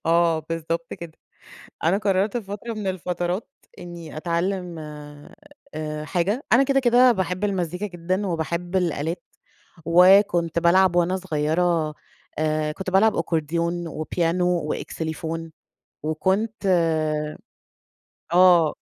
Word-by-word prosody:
آه، 165 -1 +3
بالضبط 165 +1 -4
كده، 170 -2 -9 0.7
أنا 170 +4 +3
قررت 200 +2 +1
في 230 - -5
فترة 205 +4 -6
من 210 -3 -4
الفترات 180 +1 -3 0.3
إني 170 -3 -9
أتعلم 175 +1 -2 0.9
آآ 155 -1 -4
حاجة، 195 - -1
أنا 265 +3 +6
كده 275 0 +2
كده 250 0 +5
باحب 185 -2 -2
المزيكا 185 -1 -1
جدًا 185 +3 -2
وباحب 170 +2 -3
الآلات، 170 -1 -1 0.6
وكنت 175 -1 +5
بالعب 175 +1 +4
وأنا 175 +2 +2
صغيرة 160 -1 0 0.4
آآ، 155 0 0
كنت 190 +4 -5
بالعب 205 +3 +3
Accordion 170 +2 -2
وPiano 165 +3 -1 0.3
وXylophone 160 0 -5 0.5
وكنت 195 +8 -1 1.7
آه. 175 -3 +6
175 Hz, 105 wpm, -23 LUFS, 165-190 Hz, 1.7 s, أنا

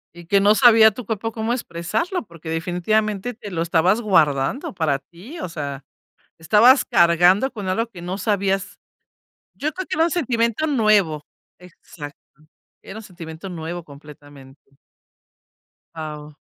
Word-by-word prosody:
Y 175 0 -12
que 200 +4 +3
no 205 +2 +4
sabía 225 -2 +7
tu 230 +3 -9
papá 225 +1 -3
cómo 225 +1 -2
expresarlo 250 - -3
porque, 170 -3 -11
definitivamente, 195 +7 -1
te 210 -3 -10
lo 165 -2 -2
estabas 175 +6 +2
guardando 165 - +1
para 155 -6 0
ti, 195 - -13
o 185 - -5
sea, 140 -4 -6 0.6
estabas 215 - +5
cargando 175 +8 +4
con 205 -5 -6
algo 225 +5 0
que 180 -6 -12
no 180 +2 -4
sabías. 195 -2 -1 0.8
Yo 305 +2 -2
creo 375 0 -5
que - - -3
era 325 - +4
un 340 - -2
sentimiento 240 -3 0
nuevo. 210 - +2 0.3
Exacto. 165 -4 -12 0.7
Era 195 - -10
un - - -9
sentimiento 170 -2 -10
nuevo, 170 0 -6
completamente. 145 -2 -16 1.2
Guau. 150 -1 -8
185 Hz, 140 wpm, -21 LUFS, 160-220 Hz, 1.2 s, sabía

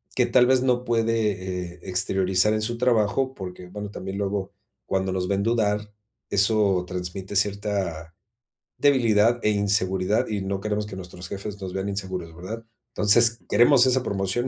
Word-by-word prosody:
que - - +3
tal 125 - +4
vez, 130 0 +3
no 125 -1 +1
puede, 105 -7 -1
eh, - - -18
exteriorizar 95 +2 +2
en 110 - -1
su 120 +2 -1
trabajo, 125 +2 +1
porque, 90 -3 -8
bueno, 105 +2 -7
también 95 -1 -6
luego 100 -1 -3 0.4
cuando 95 0 -1
nos 90 -1 -2
ven 100 0 0
dudar, 105 -2 0 0.4
eso 100 -2 +3
transmite 90 +2 -5
cierta 100 -5 -1 0.6
debilidad 120 -5 +3
e 105 - +3
inseguridad, 100 -1 +1
y 105 -2 -3
no 95 0 -3
queremos 105 +1 -2
que 100 -2 -8
nuestros 90 -1 -9
jefes 100 +1 -6
nos 95 -1 -5
vean 95 +1 -3
inseguros, 95 -4 -5
¿verdad? 110 +7 -7 0.2
Entonces, 115 +2 +4
queremos 120 +4 +6
esa 130 0 +2
promoción. 100 +4 -1
100 Hz, 160 wpm, -24 LUFS, 95-110 Hz, 0.6 s, queremos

